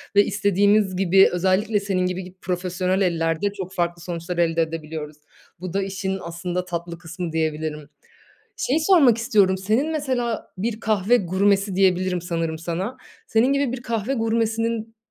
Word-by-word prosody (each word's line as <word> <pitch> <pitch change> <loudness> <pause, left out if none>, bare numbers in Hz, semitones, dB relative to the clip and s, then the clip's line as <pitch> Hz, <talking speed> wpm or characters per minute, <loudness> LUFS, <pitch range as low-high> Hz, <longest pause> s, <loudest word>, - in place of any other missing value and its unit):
ve 205 - +6
istediğimiz 200 0 +2
gibi, 190 +1 +5
özellikle 190 +4 +1
senin 195 -2 -1
gibi 180 +1 -2
gi 180 +1 -12
profesyonel 185 +1 -1
ellerde 170 +1 +1
çok 190 -2 -7
farklı 175 -1 -1
sonuçlar 175 0 -5
elde 165 -1 +2
edebiliyoruz. 155 -2 -5 0.4
Bu 180 -1 -6
da 200 - +1
işin 190 0 -3
aslında 175 +2 -4
tatlı 170 -1 -5
kısmı 175 0 -6
diyebilirim. 155 -2 -2 0.7
Şeyi 280 +5 +1
sormak 315 - +5
istiyorum, 205 -4 +3
senin 220 +11 0
mesela 255 -7 -2
bir 220 +3 -2
kahve 215 +1 +2
gurmesi 195 +1 +1
diyebilirim 185 -1 +2
sanırım 165 -2 -2
sana. 175 +9 -4 0.3
Senin 235 +5 +3
gibi 280 -3 +1
bir 255 - -5
kahve 230 +1 -2
gurmesinin 225 -1 -1
190 Hz, 145 wpm, -23 LUFS, 175-220 Hz, 0.7 s, ve